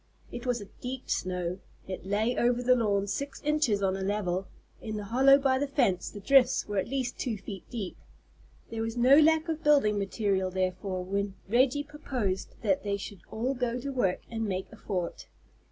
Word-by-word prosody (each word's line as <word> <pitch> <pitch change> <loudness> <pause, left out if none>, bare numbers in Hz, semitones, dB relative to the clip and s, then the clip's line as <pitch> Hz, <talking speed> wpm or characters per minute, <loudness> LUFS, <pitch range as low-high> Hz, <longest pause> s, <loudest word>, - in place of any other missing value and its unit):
It 245 +1 -6
was 245 -1 +1
a 205 - -8 0.2
deep 255 +1 -5
snow. 180 0 -2 0.3
It 190 0 -6
lay 215 +5 +1
over 245 +1 +2
the 255 +1 +5
lawn 205 -5 +1
six 280 +7 -4
inches 300 -9 +1
on 190 -1 +2
a 195 - -4
level; 190 -2 -1 0.3
in 215 -1 -4
the 210 - -4
hollow 265 +6 +6
by 265 -2 +2
the 285 - 0
fence 245 -10 +1
the 205 - -9
drifts 270 +4 +4
were 205 -1 0
at 185 - -2
least 260 -1 -2
two 230 -4 -2
feet 195 -1 -9
deep. 215 -7 -5 0.8
There 225 -1 -3
was 225 +1 -3
no 260 +5 +7
lack 320 +1 +4
of 320 0 -3
building 275 -9 +4
material 195 -2 0
therefore 185 0 -2
when 200 +1 -2
Reggie 255 +6 +3
proposed 255 -10 -3
that 195 -4 +2
they 200 -1 -1
should 200 -1 -8
all 240 +5 -1
go 245 -1 -1
to 280 +3 -4
work 220 -9 0
and 225 -1 -3
make 190 -1 -3
a - - -11
fort. 185 -5 -4
220 Hz, 195 wpm, -29 LUFS, 195-260 Hz, 0.8 s, no